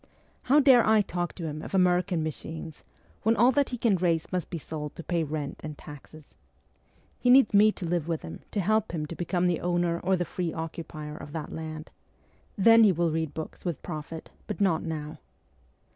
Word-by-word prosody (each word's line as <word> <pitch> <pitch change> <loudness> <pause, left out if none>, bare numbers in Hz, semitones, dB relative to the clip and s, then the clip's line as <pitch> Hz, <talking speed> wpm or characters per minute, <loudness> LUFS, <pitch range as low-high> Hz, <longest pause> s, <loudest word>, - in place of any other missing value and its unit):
How 280 +4 +4
dare 265 -4 +6
I 220 0 +4
talk 175 -4 -3
to 175 - -8
him 155 -1 -4
of - - -5
American 180 -2 +2
machines, 160 0 -7 0.4
when 225 +2 +3
all 240 +3 +5
that 285 +1 +1
he 245 - -4
can 225 -4 +2
raise 165 -2 0
must 180 -3 -2
be 170 - -4
sold 150 -1 -6
to 170 - -8
pay 170 -1 0
rent 150 -2 -5
and 150 -1 -6
taxes? 150 +1 -13 0.9
He 250 - +1
needs 255 -4 +6
me 210 +1 +6
to 180 - -6
live 170 -2 -1
with 165 -2 -2
him, 80 0 -8
to 205 - -1
help 215 +1 +1
him 155 -3 -2
to 170 - -7
become 175 +1 -1
the 175 -2 +1
owner 175 -1 0
or 190 +2 +1
the 175 -1 -1
free 175 0 -3
occupier 160 -2 -6
of 150 -1 -10
that 160 -2 -5
land. 155 0 -7 0.7
Then 225 +3 +7
he 210 - +6
will 170 -1 +1
read 160 -2 -2
books 160 - -7
with 175 -6 -4
profit, 160 -1 -7 0.2
but - - -4
not 180 -5 +2
now.' 155 -2 -5
170 Hz, 205 wpm, -27 LUFS, 155-195 Hz, 0.9 s, Then